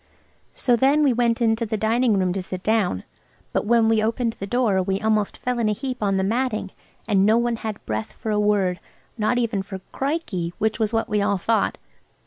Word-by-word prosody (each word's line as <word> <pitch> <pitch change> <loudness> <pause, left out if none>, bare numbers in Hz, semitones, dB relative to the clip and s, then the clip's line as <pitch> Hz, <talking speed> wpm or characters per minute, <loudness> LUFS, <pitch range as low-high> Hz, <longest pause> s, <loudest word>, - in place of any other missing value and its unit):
So 245 -2 +2
then 275 +5 +3
we 275 -4 +4
went 235 0 +1
into 225 0 +2
the 220 -1 -2
dining 225 +1 +2
room 185 -2 +1
to 195 - -2
sit 185 0 -6
down. 210 - +1 0.5
But - - 0
when 230 -1 +4
we 225 -1 +3
opened 230 +1 0
the 195 - -4
door 215 -4 +2
we 190 +1 -1
almost 215 -1 0
fell 250 -1 -2
in 220 -2 +2
a - - +2
heap 255 +3 -5
on 195 -2 +1
the 190 - +1
matting, 220 -2 -1 0.4
and 200 -3 +3
no 215 +3 +4
one 235 -1 0
had 220 -2 -6
breath 110 0 -3
for 220 - -4
a 210 - +1
word–not 210 +3 -1
even 230 -5 0
for 190 0 -7
"Krikey," 265 - -2
which 220 +1 0
was 220 -1 +1
what 225 -1 0
we 210 -2 0
all 200 0 +1
thought. 225 +5 0
220 Hz, 210 wpm, -23 LUFS, 195-235 Hz, 0.5 s, we